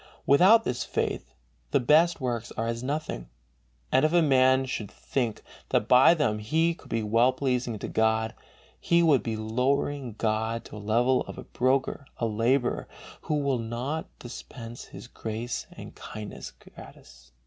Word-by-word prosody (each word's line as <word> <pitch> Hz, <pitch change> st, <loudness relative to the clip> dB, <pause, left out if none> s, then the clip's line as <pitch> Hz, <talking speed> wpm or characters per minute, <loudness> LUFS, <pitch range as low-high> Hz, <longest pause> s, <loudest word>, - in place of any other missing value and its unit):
Without 190 Hz, +11 st, +6 dB
this 125 Hz, -, -2 dB
faith 65 Hz, -, -3 dB, 0.3 s
the -, -, +3 dB
best 160 Hz, +7 st, +4 dB
works 120 Hz, -3 st, -3 dB
are 115 Hz, -, -2 dB
as 115 Hz, 0 st, -3 dB
nothing, 130 Hz, -, -4 dB, 0.6 s
and 130 Hz, -, +4 dB
if 155 Hz, -, +3 dB
man 135 Hz, -5 st, +4 dB
should 110 Hz, -6 st, -4 dB
think 120 Hz, -6 st, -3 dB, 0.3 s
that -, -, +1 dB
by 130 Hz, +7 st, +7 dB
them 120 Hz, -10 st, 0 dB
he 160 Hz, +10 st, +1 dB
could -, -, -17 dB
be 115 Hz, -1 st, -1 dB
well 115 Hz, +4 st, +3 dB
pleasing 125 Hz, -3 st, -1 dB
to -, -, -6 dB
God, 110 Hz, 0 st, +1 dB, 0.5 s
he 170 Hz, 0 st, +3 dB
would 150 Hz, -6 st, +4 dB
be 115 Hz, -2 st, -3 dB
lowering 125 Hz, +3 st, -1 dB
God 110 Hz, +1 st, -1 dB
to -, -, -13 dB
the 105 Hz, -, -8 dB
level 120 Hz, +5 st, +2 dB
of -, -, -8 dB
a -, -, -7 dB
"broker 130 Hz, +2 st, 0 dB
or 115 Hz, -, 0 dB
a -, -, -3 dB
laborer 120 Hz, +4 st, +1 dB, 0.3 s
who 155 Hz, -, -2 dB
will 140 Hz, -4 st, 0 dB
not 120 Hz, +7 st, -3 dB
dispense 120 Hz, -1 st, -9 dB
his -, -, -11 dB
grace 115 Hz, 0 st, -5 dB
and -, -, -10 dB
kindness 105 Hz, -1 st, -8 dB
gratis." 65 Hz, +1 st, -16 dB
125 Hz, 160 wpm, -27 LUFS, 110-140 Hz, 0.6 s, by